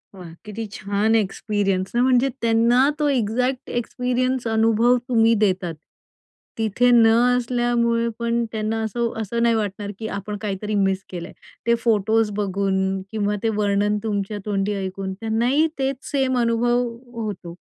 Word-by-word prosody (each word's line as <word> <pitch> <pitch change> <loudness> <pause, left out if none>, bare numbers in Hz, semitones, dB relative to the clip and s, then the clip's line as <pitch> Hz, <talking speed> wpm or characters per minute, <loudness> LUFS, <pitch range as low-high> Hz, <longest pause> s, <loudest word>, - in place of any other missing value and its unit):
वाह! 175 -3 -10
किती 215 +2 -5
छान 205 +3 0
एक्सपिरियन्स 195 -2 -1
ना, 240 - +3
म्हणजे 255 +1 +3
त्यांना 235 +4 +4
तो 295 - +2
एक्झॅक्ट 250 +2 0
एक्सपिरियन्स 250 +1 -1
अनुभव 225 +2 +3
तुम्ही 230 -1 +4
देतात. 185 -4 0 0.8
तिथे 225 +3 +2
न 230 -2 +6 0.3
असल्यामुळे 235 -1 +1
पण 235 0 0
त्यांना 220 0 -2
असं, 230 +2 -1
असं 235 +3 -1
नाही 230 -1 +3
वाटणार, 205 -1 -3
की 220 - -4
आपण 205 +1 -5
काहीतरी 210 0 -3
मिस 195 -1 +1
केलंय. 175 -2 -7 0.3
ते 235 - +5
फोटोज् 220 -1 +2
बघून 195 -1 0
किंवा 210 -1 -1
ते 225 - +2
वर्णन 205 0 +1
तुमच्या 205 -1 -2
तोंडी 205 0 -1
ऐकून, 190 0 -4
त्यांनाही 235 +9 +1
तेच 270 0 0 0.2
सेम 265 -2 +1
अनुभव 240 +1 +2 0.3
होतो. 180 -5 -6
225 Hz, 140 wpm, -22 LUFS, 200-240 Hz, 0.8 s, न